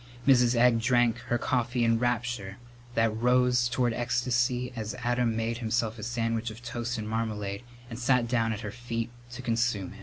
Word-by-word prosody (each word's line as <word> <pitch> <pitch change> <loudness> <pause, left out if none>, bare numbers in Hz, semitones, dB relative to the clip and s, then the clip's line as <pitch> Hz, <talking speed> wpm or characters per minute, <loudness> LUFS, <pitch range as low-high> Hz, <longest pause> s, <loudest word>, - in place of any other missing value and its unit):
Mrs. 125 -2 +5
Egg 120 -1 +4
drank 120 0 +3
her 120 - +1
coffee 120 0 0
in 115 0 +3
rapture 120 -5 -2 0.4
that 115 -1 +2
rose 125 +1 +3
toward 120 -1 +1
ecstasy 125 +1 0
as 110 +1 -4
Adam 120 -2 0
made 115 +1 -2
himself 115 -1 -1
a - - -7
sandwich 115 -1 -1
of 110 +2 -11
toast 120 0 -3
and 110 -1 -4
marmalade 105 -2 -3 0.3
and 120 -1 -7
sat 125 -1 +2
down 115 -1 +1
at 110 0 -4
her 105 -3 -5
feet 115 0 -4 0.2
to 130 +1 -7
consume 115 -6 0
it. 105 - -14
120 Hz, 180 wpm, -28 LUFS, 115-125 Hz, 0.4 s, Mrs